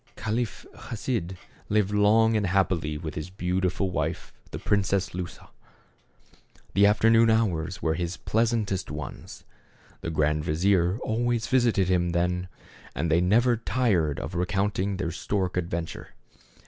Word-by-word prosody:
Caliph 110 Hz, 0 st, -3 dB, 0.2 s
Chasid 105 Hz, -5 st, -3 dB, 0.3 s
lived 105 Hz, -1 st, +2 dB
long 110 Hz, +2 st, +4 dB
and 105 Hz, -2 st, +1 dB
happily 90 Hz, -5 st, 0 dB
with 80 Hz, -1 st, -6 dB
his 75 Hz, +3 st, -5 dB
beautiful 90 Hz, +1 st, -1 dB
wife, 80 Hz, 0 st, -3 dB, 0.2 s
the -, -, -6 dB
Princess 100 Hz, -1 st, 0 dB
Lusa. 90 Hz, 0 st, -7 dB, 1.2 s
The 100 Hz, +1 st, +5 dB
after 105 Hz, +2 st, +3 dB
noon 115 Hz, 0 st, +5 dB
hours 95 Hz, -7 st, 0 dB
were 80 Hz, -, +2 dB
his 85 Hz, +1 st, -3 dB
pleasantest 110 Hz, -4 st, 0 dB
ones. 75 Hz, 0 st, -8 dB, 0.6 s
The -, -, -3 dB
grand 75 Hz, -1 st, +1 dB
vizier 90 Hz, +4 st, +2 dB
always 120 Hz, +1 st, 0 dB
visited 120 Hz, -7 st, +2 dB
him 90 Hz, -2 st, +1 dB
then, 90 Hz, +1 st, 0 dB, 0.5 s
and 85 Hz, -, -1 dB
they 85 Hz, +2 st, +4 dB
never 120 Hz, +7 st, +3 dB
tired 105 Hz, -, 0 dB
of 80 Hz, -, -6 dB
recounting 95 Hz, +2 st, -1 dB
their 85 Hz, -4 st, -2 dB
stork 95 Hz, +1 st, -2 dB
adventure. 85 Hz, -2 st, -4 dB
95 Hz, 135 wpm, -26 LUFS, 85-110 Hz, 1.2 s, The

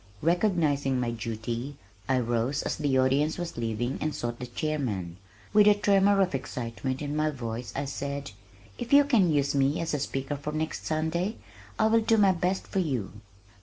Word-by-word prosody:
Recognizing 155 Hz, -7 st, +2 dB
my 120 Hz, -1 st, -1 dB
duty 115 Hz, +4 st, -4 dB, 0.3 s
I 130 Hz, -, +3 dB
rose 120 Hz, +3 st, 0 dB
just -, -, -13 dB
as -, -, -1 dB
the 145 Hz, -3 st, +1 dB
audience 135 Hz, +4 st, +2 dB
was 175 Hz, -1 st, -5 dB
leaving 120 Hz, +2 st, -2 dB
and 155 Hz, 0 st, -1 dB
sought 120 Hz, 0 st, -4 dB
the 125 Hz, -, -5 dB
chairman. 120 Hz, -, -3 dB, 0.4 s
With 210 Hz, 0 st, +6 dB
a 210 Hz, -, +7 dB
tremor 200 Hz, -1 st, +3 dB
of 185 Hz, -4 st, +1 dB
excitement 130 Hz, +1 st, -4 dB
in 145 Hz, 0 st, -3 dB
my 155 Hz, 0 st, +2 dB
voice 120 Hz, -4 st, -5 dB
I 140 Hz, -, -1 dB
said, 140 Hz, -1 st, -4 dB, 0.5 s
"If 240 Hz, -, -5 dB
you 285 Hz, 0 st, +9 dB
can 225 Hz, -, +3 dB
use 140 Hz, -2 st, +1 dB
me 140 Hz, +1 st, +2 dB
as 165 Hz, -1 st, -2 dB
a 150 Hz, -, 0 dB
speaker 135 Hz, +1 st, -3 dB
for 150 Hz, +2 st, -5 dB
next 155 Hz, 0 st, -3 dB
Sunday 160 Hz, +6 st, -1 dB, 0.4 s
I 220 Hz, -, +3 dB
will 225 Hz, +1 st, +4 dB
do 225 Hz, 0 st, +3 dB
my 200 Hz, -2 st, +5 dB
best 180 Hz, +2 st, -1 dB
for 195 Hz, -, -2 dB
you." 130 Hz, -, -1 dB
145 Hz, 190 wpm, -28 LUFS, 125-175 Hz, 0.5 s, you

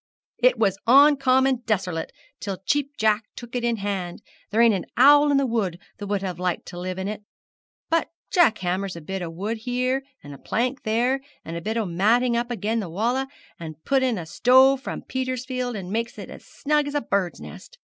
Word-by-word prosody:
'It -, -, +4 dB
was 195 Hz, -3 st, +1 dB
oncommon 265 Hz, -1 st, +5 dB
deserlate 185 Hz, -6 st, -1 dB, 0.3 s
till 195 Hz, -2 st, -4 dB
Cheap 290 Hz, 0 st, 0 dB
Jack 215 Hz, 0 st, +2 dB
took 240 Hz, 0 st, -9 dB
it 245 Hz, -, -1 dB
in 235 Hz, -1 st, +1 dB
hand; 195 Hz, -4 st, -4 dB, 0.3 s
there 215 Hz, -, 0 dB
ain't 230 Hz, -1 st, +6 dB
a 185 Hz, -4 st, -2 dB
owl 290 Hz, +3 st, +7 dB
in 285 Hz, -, +3 dB
the 275 Hz, -, +2 dB
wood 215 Hz, -8 st, -1 dB, 0.2 s
that 205 Hz, -, -6 dB
would 200 Hz, -1 st, -1 dB
have 180 Hz, -3 st, -4 dB
liked 180 Hz, -1 st, -2 dB
to 175 Hz, -, -8 dB
live 185 Hz, +1 st, -4 dB
in 190 Hz, +1 st, -3 dB
it; 210 Hz, 0 st, -5 dB, 0.7 s
but 330 Hz, -1 st, +1 dB, 0.2 s
Jack 335 Hz, -, +4 dB
hammers 185 Hz, +1 st, -2 dB
a -, -, -7 dB
bit 190 Hz, +5 st, -5 dB
of 165 Hz, -2 st, -5 dB
wood 210 Hz, +6 st, -3 dB
here, 250 Hz, +3 st, -1 dB, 0.2 s
and 145 Hz, -, -9 dB
a 140 Hz, -, -12 dB
plank 255 Hz, +4 st, -2 dB
there, 245 Hz, +5 st, 0 dB, 0.2 s
and 165 Hz, -, -6 dB
a 170 Hz, -, -4 dB
bit 220 Hz, +6 st, -2 dB
o' 225 Hz, -, 0 dB
matting 225 Hz, +8 st, +2 dB
up 240 Hz, +1 st, -1 dB
agen 225 Hz, 0 st, -1 dB
the 195 Hz, -6 st, -4 dB
walls, 240 Hz, +9 st, -1 dB, 0.3 s
and 160 Hz, -2 st, -9 dB
puts 270 Hz, -1 st, +2 dB
in 250 Hz, -4 st, +1 dB
a 170 Hz, -, -5 dB
stove 260 Hz, +9 st, +4 dB
from -, -, -6 dB
Petersfield, 255 Hz, -1 st, -3 dB
and 190 Hz, -2 st, -6 dB
makes 230 Hz, +1 st, -2 dB
it -, -, -8 dB
as -, -, -11 dB
snug 295 Hz, 0 st, -1 dB
as 285 Hz, -, -5 dB
a 290 Hz, -, +1 dB
burd's 195 Hz, -5 st, -1 dB
nest. -, -, -12 dB
230 Hz, 210 wpm, -24 LUFS, 190-260 Hz, 0.7 s, owl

